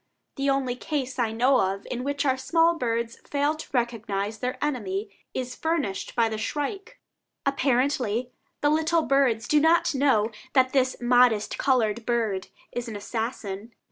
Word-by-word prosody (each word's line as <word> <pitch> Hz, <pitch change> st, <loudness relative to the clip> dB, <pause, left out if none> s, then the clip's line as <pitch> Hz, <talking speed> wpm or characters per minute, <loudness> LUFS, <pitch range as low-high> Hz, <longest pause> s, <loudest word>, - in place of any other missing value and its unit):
The 275 Hz, 0 st, 0 dB
only 270 Hz, -2 st, +1 dB
case 265 Hz, -1 st, -3 dB
I 230 Hz, -2 st, +1 dB
know 250 Hz, +4 st, +3 dB
of 195 Hz, +1 st, -1 dB
in 250 Hz, 0 st, -3 dB
which 285 Hz, +1 st, -1 dB
our 260 Hz, -2 st, +3 dB
small 330 Hz, +6 st, +3 dB
birds 235 Hz, -6 st, -2 dB
fail 285 Hz, +1 st, 0 dB
to 310 Hz, -, -9 dB
recognize 220 Hz, -4 st, -1 dB
their 250 Hz, 0 st, -2 dB
enemy 210 Hz, -8 st, -2 dB, 0.2 s
is 255 Hz, -1 st, -3 dB
furnished 310 Hz, -, -2 dB
by 230 Hz, -1 st, +3 dB
the 220 Hz, -1 st, -3 dB
shrike; 295 Hz, -, -4 dB, 0.5 s
apparently 255 Hz, -3 st, +1 dB, 0.3 s
the 290 Hz, -, +3 dB
little 320 Hz, +1 st, +2 dB
birds 255 Hz, -6 st, +2 dB
do 300 Hz, -, +4 dB
not 325 Hz, +2 st, +3 dB
know 260 Hz, -6 st, +2 dB, 0.2 s
that 260 Hz, -1 st, +3 dB
this 260 Hz, -2 st, +2 dB
modest 240 Hz, -3 st, +3 dB
colored 235 Hz, -4 st, +2 dB
bird 220 Hz, -6 st, 0 dB, 0.2 s
is 245 Hz, 0 st, -4 dB
an 220 Hz, -, -6 dB
assassin. 220 Hz, 0 st, -4 dB
250 Hz, 155 wpm, -26 LUFS, 225-280 Hz, 0.5 s, do